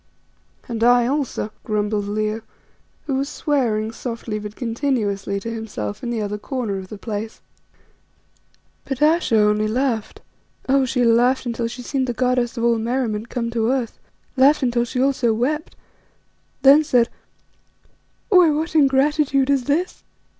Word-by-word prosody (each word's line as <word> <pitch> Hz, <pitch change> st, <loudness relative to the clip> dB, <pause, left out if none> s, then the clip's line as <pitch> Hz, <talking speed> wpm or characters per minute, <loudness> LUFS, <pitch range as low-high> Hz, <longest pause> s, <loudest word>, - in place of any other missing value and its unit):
"And 230 Hz, -2 st, -3 dB
I 245 Hz, 0 st, +5 dB
also," 265 Hz, -5 st, -2 dB
grumbled 210 Hz, -1 st, -1 dB
Leo, 215 Hz, +1 st, -2 dB, 0.6 s
who 275 Hz, -3 st, -1 dB
was 275 Hz, +1 st, -2 dB
swearing 225 Hz, -7 st, 0 dB
softly 230 Hz, -2 st, -5 dB
but 210 Hz, 0 st, -8 dB
continuously 225 Hz, -6 st, -1 dB
to 230 Hz, +3 st, -5 dB
himself 155 Hz, -, -5 dB
in 240 Hz, -, -4 dB
the 230 Hz, -3 st, -2 dB
other 210 Hz, 0 st, -4 dB
corner 220 Hz, -5 st, -3 dB
of 190 Hz, -, -9 dB
the 210 Hz, -, -9 dB
place. 220 Hz, +1 st, -5 dB, 1.4 s
But 270 Hz, -2 st, -4 dB
Ayesha 305 Hz, -6 st, +3 dB
only 210 Hz, 0 st, +3 dB
laughed, 235 Hz, -1 st, -2 dB, 0.5 s
oh! 270 Hz, 0 st, +3 dB
she 250 Hz, -1 st, +1 dB
laughed 245 Hz, +3 st, +3 dB
until 235 Hz, -1 st, -2 dB
she 245 Hz, +2 st, -8 dB
seemed 265 Hz, +1 st, -1 dB
the 245 Hz, -, -1 dB
goddess 250 Hz, -1 st, 0 dB
of 230 Hz, -, -2 dB
all 235 Hz, -1 st, +3 dB
merriment 230 Hz, -2 st, -2 dB
come 235 Hz, -1 st, -3 dB
to 230 Hz, -1 st, 0 dB
earth, 255 Hz, -3 st, -2 dB, 0.4 s
laughed 275 Hz, +2 st, +4 dB
till 235 Hz, 0 st, +1 dB
she 250 Hz, -, -4 dB
also 255 Hz, -4 st, +2 dB
wept, 300 Hz, +8 st, -2 dB, 0.9 s
then 280 Hz, +3 st, +7 dB
said 250 Hz, -6 st, +3 dB, 1.2 s
"Why, 365 Hz, -4 st, +6 dB
what 310 Hz, +2 st, -1 dB
ingratitude 280 Hz, -1 st, +3 dB
is 270 Hz, -3 st, +1 dB
this? 315 Hz, +6 st, -1 dB
240 Hz, 145 wpm, -21 LUFS, 220-270 Hz, 1.4 s, then